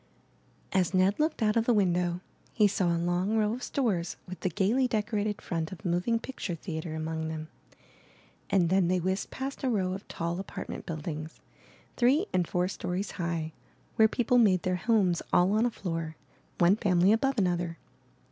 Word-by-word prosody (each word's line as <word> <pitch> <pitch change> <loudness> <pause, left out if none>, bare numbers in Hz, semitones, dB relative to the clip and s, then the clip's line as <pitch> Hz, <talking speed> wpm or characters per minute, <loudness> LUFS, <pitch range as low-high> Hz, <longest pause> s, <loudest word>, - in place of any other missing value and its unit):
As 190 -1 +2
Ned 185 +5 +3
looked 305 -5 +1
out 215 0 +2
of 230 -1 +2
the 240 - +3
window, 180 -3 +1 0.3
he 210 -3 +5
saw 195 -2 0
a 170 0 +2
long 175 +5 0
row 215 0 +2
of 250 - -5
stores 200 -12 -1
with 185 0 -7
the 185 - 0
gaily 220 +10 +2
decorated 210 -2 -1
front 165 -3 -3
of 190 +2 -10
a - - +1
moving 180 +7 +1
picture 225 -7 -5
theatre 160 -1 -5
among 160 0 -3
them, 160 0 -5 1.0
and 180 -4 +3
then 190 -2 +4
they 185 +1 +2
whizzed 190 +3 -1
past 270 +1 -5
a 260 - +2
row 190 -5 0
of 195 - -7
tall 170 +2 -3
apartment 195 - -6
buildings, 155 -1 -5 0.6
three 270 +9 +4
and 180 -2 +2
four 180 0 0
stories 185 +1 -3
high, 170 -2 -3 0.4
where 220 - +6
people 245 +2 +2
made 190 -6 +4
their 185 0 0
homes 200 -5 +2
all 180 +2 +4
on 220 +3 +3
a - - 0
floor, 165 -7 -4 0.4
one 175 +3 +5
family 185 -3 +3
above 270 +4 +1
another. 175 -4 0
185 Hz, 180 wpm, -29 LUFS, 170-215 Hz, 1.0 s, where